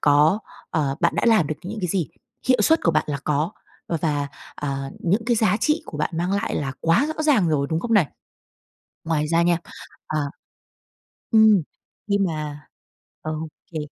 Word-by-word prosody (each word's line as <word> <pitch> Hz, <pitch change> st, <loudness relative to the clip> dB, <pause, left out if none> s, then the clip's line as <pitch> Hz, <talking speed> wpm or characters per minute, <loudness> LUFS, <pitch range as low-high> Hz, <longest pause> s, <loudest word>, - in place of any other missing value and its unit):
có, 150 Hz, +6 st, +5 dB, 0.3 s
ờ, 140 Hz, -3 st, 0 dB
bạn -, -, +2 dB
đã -, -, +1 dB
làm 220 Hz, -10 st, +5 dB
được 155 Hz, -, -3 dB
những 215 Hz, +3 st, -5 dB
cái 180 Hz, -, -1 dB
gì, 170 Hz, -2 st, 0 dB, 0.4 s
hiệu 255 Hz, -, +4 dB
suất 320 Hz, 0 st, +4 dB
của 165 Hz, -, +4 dB
bạn 155 Hz, -, +2 dB
là 145 Hz, -2 st, -1 dB
có 150 Hz, +2 st, 0 dB, 0.4 s
và 170 Hz, -, +1 dB
và, 145 Hz, -3 st, 0 dB, 0.3 s
à, 140 Hz, -1 st, -3 dB
những 200 Hz, +6 st, +1 dB
cái 240 Hz, -1 st, +3 dB
giá 215 Hz, -2 st, +3 dB
trị 305 Hz, +5 st, +2 dB
của 150 Hz, -, -7 dB
bạn 150 Hz, -, 0 dB
mang 175 Hz, +3 st, 0 dB
lại 200 Hz, +3 st, -1 dB
là 135 Hz, -3 st, -2 dB
quá 165 Hz, -, +3 dB
rõ 310 Hz, -, -1 dB
ràng 255 Hz, -, +4 dB
rồi, 140 Hz, -3 st, +1 dB
đúng 160 Hz, -, 0 dB
không 230 Hz, +3 st, -2 dB
này? 190 Hz, -8 st, +5 dB, 1.0 s
Ngoài 155 Hz, -2 st, 0 dB
ra 165 Hz, +2 st, +3 dB
nha 170 Hz, 0 st, +3 dB, 0.5 s
à. 155 Hz, -, -1 dB, 1.1 s
Ừm. 220 Hz, -3 st, +6 dB, 0.5 s
Nhưng 200 Hz, -1 st, +2 dB
mà 150 Hz, -3 st, -4 dB, 0.6 s
ừ, 155 Hz, -, -3 dB
ô 160 Hz, -, -5 dB, 0.2 s
kê. 160 Hz, -, -3 dB
165 Hz, 190 wpm, -23 LUFS, 150-205 Hz, 1.1 s, Ừm